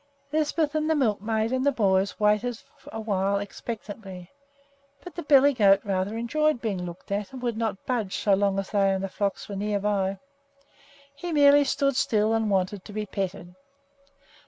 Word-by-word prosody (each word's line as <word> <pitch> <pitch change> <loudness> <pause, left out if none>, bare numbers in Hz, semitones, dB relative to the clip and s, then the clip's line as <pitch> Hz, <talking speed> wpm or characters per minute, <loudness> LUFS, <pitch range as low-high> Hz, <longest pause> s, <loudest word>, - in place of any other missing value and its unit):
Lisbeth 310 0 0
and 310 0 0
the 320 - +3
milkmaid 220 -3 0
and 260 0 0
the 285 - +3
boys 195 -5 +1
waited 210 +3 +1 0.3
a 225 - -6
while 200 -2 0
expectantly; 200 -3 -7 0.7
but 360 - -9
the 345 - -5
billy 285 -2 +5
goat 200 -5 +5
rather 200 +1 -2
enjoyed 305 +4 +1
being 200 -6 -3
looked 175 +3 -10
at, 200 0 -2
and 260 -2 -9
would 240 -2 -1
not 220 -3 -3
budge 225 -7 -2
so 205 - +2
long 195 0 +2
as 195 -1 -3
they 200 -2 +3
and 190 - -3
the - - -1
flocks 200 +1 -3
were 200 - -6
near 205 +1 -1
by. 195 -1 0 1.0
He 345 +5 -6
merely 290 -1 +6
stood 275 0 +1
still 225 -5 +2
and 225 -1 +1
wanted 190 0 0
to 210 - -10
be 215 0 -3
petted. 190 -3 -5
210 Hz, 180 wpm, -26 LUFS, 195-255 Hz, 1.0 s, merely